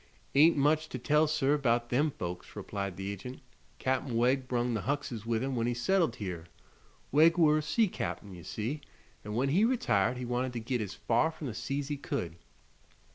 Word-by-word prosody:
"Ain't 155 +3 +6
much 155 +2 +2
to - - -4
tell, 150 +5 +3
sir, 150 -1 +2
'bout 120 -3 +1
them 145 +5 +3
folks," 90 -9 -6
replied 100 -3 -4
the 95 +1 -3
agent. 125 +6 -7 0.4
"Cap'n 130 -2 -1
Wegg 130 +2 +2
brung 120 -1 0
the 110 - -1
Huckses 125 -5 -3
with 115 0 0
him 135 -1 -2
when 115 -1 0
he 120 - 0
settled 160 +1 +2
here. 90 -6 -5 0.6
Wegg 160 +4 +5
were 155 -2 +5
a - - -1
sea 215 +9 +2
cap'n, 100 - -5
ye 90 - -10
see, 115 - -4 0.4
an' 105 0 -5
when 130 +4 +1
he 180 +9 +3
retired 225 - +2
he 125 - -4
Wanted 125 +1 -1
to 120 - -3
git 120 +1 -2
as 100 -3 -5
far 120 +7 +2
from 160 -1 -8
the 125 - -3
sea's 140 +5 -3
he 145 - -2
could." 85 -10 -4
125 Hz, 200 wpm, -31 LUFS, 115-150 Hz, 0.6 s, Ain't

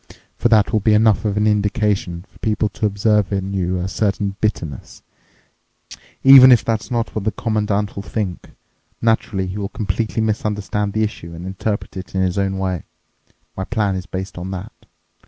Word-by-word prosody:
For 120 - +1
that 110 0 +4
will 110 - +4
be 105 +1 +3
enough 110 -1 +3
of 105 -1 0
an 105 - +2
indication 105 -4 0
for - - -23
people 110 0 0
to 105 - -1
observe 105 -1 +1
in 100 0 -2
you 90 -1 -1
a 90 +1 -2
certain 100 -1 -1
bitterness, 80 - -3 1.2
even 135 -1 +10
if 120 - +5
that's 110 +1 -1
not 120 -2 -2
what 110 - -3
the 110 - 0
Commandant 105 -2 -1
will 100 - -4
think. 100 -3 -4 0.5
Naturally, 110 -4 +1
he 95 +3 -5
will 100 -1 -3
completely 110 +2 -2
misunderstand 105 -1 -1
the 110 - +1
issue 85 -6 -5
and 85 +2 -8
interpret 100 +2 -3
it 95 0 -8
in 95 - +1
his 95 +1 0
own 95 0 0
way. 95 -3 -2 0.7
My 95 - -3
plan 105 -1 0
is 95 0 -5
based 95 -1 -5
on 90 +2 -5
that. 95 +3 -6
105 Hz, 180 wpm, -20 LUFS, 95-110 Hz, 1.2 s, even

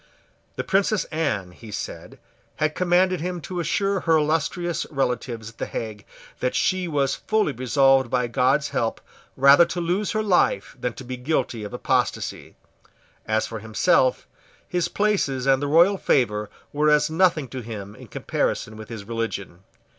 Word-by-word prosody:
The - - -3
Princess 200 +1 +1
Anne, 135 - -1
he 110 +5 -13
said, 105 - -7 0.4
had 155 0 0
commanded 180 0 +2
him 180 +1 -3
to 180 +3 -5
assure 195 +4 0
her 165 -2 +3
illustrious 160 +3 -1
relatives 125 -5 -2
at 115 - -27
the - - -2
Hague 110 -2 -6 0.3
that 125 - -1
she 185 -1 +1
was 140 -4 +1
fully 215 -7 0
resolved 135 +1 +3
by 125 0 +1
God's 130 +5 +1
help 115 - -1 0.4
rather 140 +4 +7
to 175 - -4
lose 180 +6 -1
her 215 0 0
life 180 - +1
than 125 - -1
to - - -10
be 125 0 -6
guilty 125 -4 -1
of 105 - -6
apostasy. - - -2 0.7
As 110 0 +1
for 115 - -6
himself, 110 +4 +2 0.4
his 175 -1 0
places 190 -12 0
and 135 0 +3
the 145 - -1
royal 175 +6 +5
favour 105 -5 +1 0.2
were 150 +1 +2
as 150 +1 +3
nothing 165 -4 +2
to 130 - -6
him 105 -3 -7
in - - -13
comparison 110 0 -2
with 110 -1 -10
his 110 -4 -7
religion. 110 -5 -4
140 Hz, 160 wpm, -24 LUFS, 115-175 Hz, 0.7 s, rather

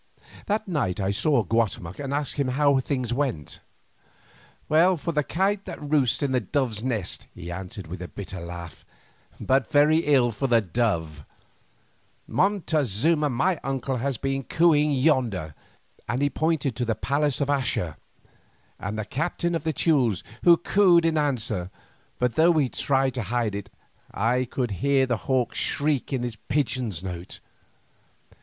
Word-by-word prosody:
That 215 +1 -1
night 135 - -1
I 95 0 0
saw 120 +4 +2
Guatemoc 100 -4 -1
and 140 -1 -4
asked 145 0 -2
him 140 -2 +1
how 140 +1 +3
things 130 -3 -2
went. 120 - -3 1.1
"Well 170 +4 +4
for 160 +3 -3
the 150 -2 +1
kite 195 +6 0
that - - -7
roosts 145 -3 +1
in 140 - 0
the 130 - +2
dove's 115 -1 -1
nest," 115 -8 -2
he 85 0 -7
answered 95 +3 -7
with 85 +3 -8
a 90 - -5
bitter 95 -2 -7
laugh, 85 0 -8 0.6
"but 130 -3 +1
very 150 +2 +5
ill 135 -6 +3
for 135 +5 -2
the 120 -2 +4
dove. 85 -8 -1 1.0
Montezuma, 155 - +1
my 140 +7 +1
uncle, 135 -1 -2
has 135 +1 -2
been 135 +2 -2
cooing 150 +1 +3
yonder," 125 - +1 0.6
and 125 +4 0
he 145 - +1
pointed 155 -6 0
to 125 - -1
the 115 -1 0
palace 140 +6 0
of 140 - 0
Axa, 125 - 0 0.8
"and 100 +2 -4
the 110 - -3
captain 170 +7 -2
of 165 -3 -2
the 160 - 0
Teules 135 - +1 0.2
has 170 -1 +7
cooed 180 -4 +4
in 165 -1 +2
answer, 115 - -1 0.5
but 125 -1 0
though 165 +7 +5
he 145 -5 +2
tried 135 0 +1
to 125 - -3
hide 115 0 -1
it, 100 -1 -6 0.4
I 125 +4 +1
could 125 -1 -3
hear 140 -1 +3
the 120 -3 0
hawk's 125 -3 0
shriek 145 -2 0
in 130 -3 -1
his 120 -2 -4
pigeon's 125 - -2
note. 90 -1 -6
130 Hz, 160 wpm, -25 LUFS, 110-150 Hz, 1.1 s, has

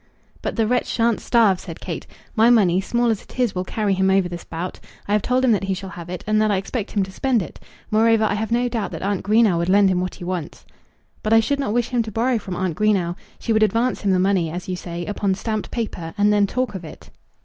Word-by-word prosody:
"But - - -3
the 225 - +2
wretch 250 +3 +1
shan't 230 -1 +1
starve," 220 -6 +3
said 165 -3 -9
Kate. - - -6 0.3
"My 225 +1 +5
money, 190 -6 +4
small 235 +3 +1
as 215 - -2
it - - -14
is, 245 -5 +2
will 180 - -2
carry 205 +1 -1
him 190 0 +2
over 190 -1 +3
this 175 -1 -7
bout. 170 +3 -6 0.3
I 205 - 0
have 210 - +3
told 255 +4 +1
him 250 - +4
that 200 -2 +1
he 195 -1 -1
shall 190 0 -7
have 170 0 -9
it, 180 -1 -5
and 215 0 +2
that 215 - +2
I 200 - +2
expect 200 +3 -4
him 200 - +2
to 190 - -7
spend 245 0 +1
it. 155 - -11 0.3
Moreover, 225 +1 +4
I 215 - +2
have 220 +2 -2
no 240 +1 +2
doubt 230 -4 -2
that - - -5
Aunt 200 -1 0
Greenow 210 -4 +3
would 170 +1 -1
lend 200 0 +5
me - - +2
what 180 0 -2
he - - -10
wants." 175 -3 -5 0.6
"But 215 - +1
I 225 - +7
should 280 +5 0
not 270 -7 -1
wish 240 +1 0
him 245 -2 +1
to 220 -1 -5
borrow 235 +3 +1
from 190 -3 -6
Aunt 180 -2 -2
Greenow. 195 -5 +1 0.2
She 230 - -1
would 220 - +2
advance 230 +3 +1
him 200 - 0
the 190 - +3
money, 185 -3 +2
as 175 +3 -6
you 185 - -2
say, 175 -1 -6
upon 200 -2 -1
stamped 215 -1 -3
paper, 180 -8 -4
and 205 +1 +4
then 205 -1 +3
talk 255 +3 -2
of 190 -3 -6
it." 155 - -12
205 Hz, 270 wpm, -22 LUFS, 185-225 Hz, 0.6 s, I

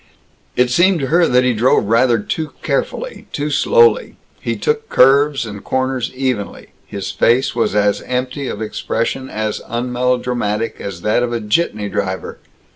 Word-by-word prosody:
It 125 0 +2
seemed 175 +5 +4
to 135 - -1
her 170 +2 +4
that 125 0 +3
he 125 -1 +2
drove 120 +4 +3
rather 115 +3 +3
too 150 +9 -4
carefully, - - -3
too 150 +1 -3
slowly. 470 - +3 0.2
He - - -2
took 450 0 -1
curves 140 0 +4
and 105 -2 -8
corners 130 -1 -1
evenly. 130 -6 -3 0.2
His 100 -1 -5
face 120 +6 +2
was 115 -3 0
as 105 -1 +2
empty 125 +2 -3
of 110 - -4
expression, 115 +4 -3
as 110 -1 -3
unmelodramatic, 120 -2 -1
as 95 -3 -6
that 105 +3 +2
of 120 -1 -1
a 120 - -1
jitney 105 -1 0
driver. 95 -1 -4
125 Hz, 155 wpm, -18 LUFS, 110-135 Hz, 0.2 s, seemed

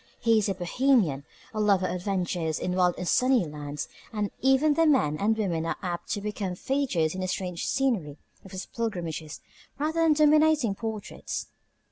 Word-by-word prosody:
He 225 -1 +4
is 205 - 0
a 195 - -1
Bohemian, 180 - +1 0.3
a 215 - -3
lover 200 -3 +3
of 180 - -1
adventures 180 -4 -1
in 180 0 -2
wild 180 -1 +3
and 180 - -4
sunny 255 -3 +3
lands, 150 -1 -6 0.2
and 210 -2 -2
even 270 +3 +4
the 330 +2 +3
men 255 - +3
and 220 +2 +2
women 175 -7 -1
are 165 - -1
apt 175 -2 -4
to 205 - -3
become 200 -3 -3
features 220 - 0
in 185 - -4
the 185 - -1
strange 180 -2 -3
scenery 220 - 0 0.3
of 195 - -12
his 185 0 -6
pilgrimages 170 -9 -4 0.4
rather 315 +3 0
than 325 -2 +5
dominating 305 -5 +4
portraits. 220 0 -5
200 Hz, 175 wpm, -27 LUFS, 175-260 Hz, 0.4 s, than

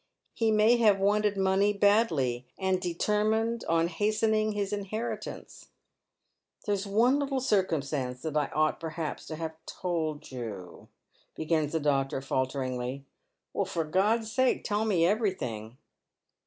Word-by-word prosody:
He 225 -1 +1
may 215 +2 +5
have 215 -4 +5
wanted 205 +1 +2
money 195 +2 +3
badly, 165 - +2
and 190 -1 0
determined 215 +6 0
on 165 0 +3
hastening 215 +4 +1
his 205 -1 -2
inheritance." 205 +3 -5 0.5
" - - -37
There 205 - +1
is 200 0 -2
one 235 +7 +3
little 275 -2 -1
circumstance 150 - -1
that 155 -2 -3
I 150 -2 +2
ought, 155 0 0
perhaps, 160 -1 -5
to 155 - -5
have 160 0 -5
told 160 -6 -3
you," 105 -8 -7 0.5
begins 155 -1 0
the 160 - +1
doctor, 135 -2 0
falteringly. 130 0 -2 0.6
"For 165 - -1
God's 210 +8 +1
sake 260 +2 +2
tell 210 0 0
me 180 -6 +3
everything." 130 - -1
185 Hz, 130 wpm, -29 LUFS, 150-215 Hz, 0.6 s, may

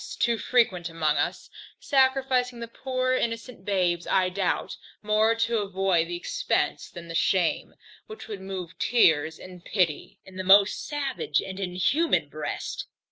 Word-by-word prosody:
too 235 -1 +1
frequent 190 -9 +1
among 155 -2 0
us, - - -2 0.3
sacrificing 260 -3 +1
the 235 - -5
poor 255 +2 -2
innocent 230 -3 -3
babes, 180 -4 0
I 185 -1 +2
doubt, 185 0 -2 0.3
more 215 +2 +3
to 230 0 0
avoid 190 -4 +1
the 175 - -4
expence 175 - -1
than 170 -1 -10
the 165 - -7
shame, 175 +1 +1 0.3
which 435 0 -10
would 205 -3 -7
move 185 -3 -7
tears 160 -9 +3
and 180 -1 -12
pity 185 +1 -1
in 185 -1 -13
the 185 - -3
most 195 +2 +5
savage 285 -3 -1
and 190 0 -6
inhuman 195 - +1
breast. - - -5
195 Hz, 145 wpm, -26 LUFS, 180-235 Hz, 0.3 s, most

